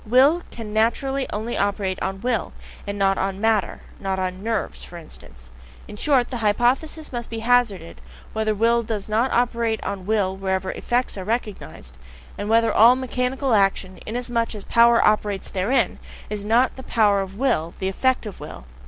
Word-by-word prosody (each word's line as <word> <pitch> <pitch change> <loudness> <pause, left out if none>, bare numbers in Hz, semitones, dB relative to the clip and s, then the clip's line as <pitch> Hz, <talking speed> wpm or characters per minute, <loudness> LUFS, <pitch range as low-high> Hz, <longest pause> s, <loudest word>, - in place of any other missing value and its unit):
"Will" 270 +9 +4
can 220 -3 -8
naturally 265 +5 +1
only 220 +3 -3
operate 200 -2 -1
on 195 0 -3
"will" 240 -3 -1 0.3
and 200 0 -3
not 195 -1 +2
on 195 0 -2
"matter" 220 -2 +1 0.2
(not 195 -1 -2
on 185 0 -3
"nerves," 225 -1 -3
for 175 - -10
instance): 65 - -13 0.4
in - - -9
short, 260 +1 +1
the 250 - -2
hypothesis 245 +8 0
must 240 -1 -4
be 230 - -5
hazarded, 230 -9 +1 0.3
whether 220 -1 0
will 230 +3 +3
does 215 -3 -4
not 225 +5 +1
operate 235 -2 +1
on 195 -2 -5
will 200 -3 +1
wherever 190 -1 -2
"effects" 245 -4 -2
are - - -5
recognized 200 - -5 0.4
and 205 +1 -5
whether 230 0 +3
all 235 +3 +7
mechanical 260 0 -1
action, 195 -2 +1
inasmuch 235 0 -2
as 205 - -7
a - - -17
power 235 0 +5
operates 210 -2 +1
therein, 210 +3 0 0.3
is 210 -1 -3
not 235 +5 +3
just - - -21
the - - -7
power 205 -4 +3
of 195 0 -7
will, 170 -11 0
the 190 - -2
effect 255 +6 0
of 210 - -8
will. 60 - -9
220 Hz, 180 wpm, -23 LUFS, 195-240 Hz, 0.4 s, all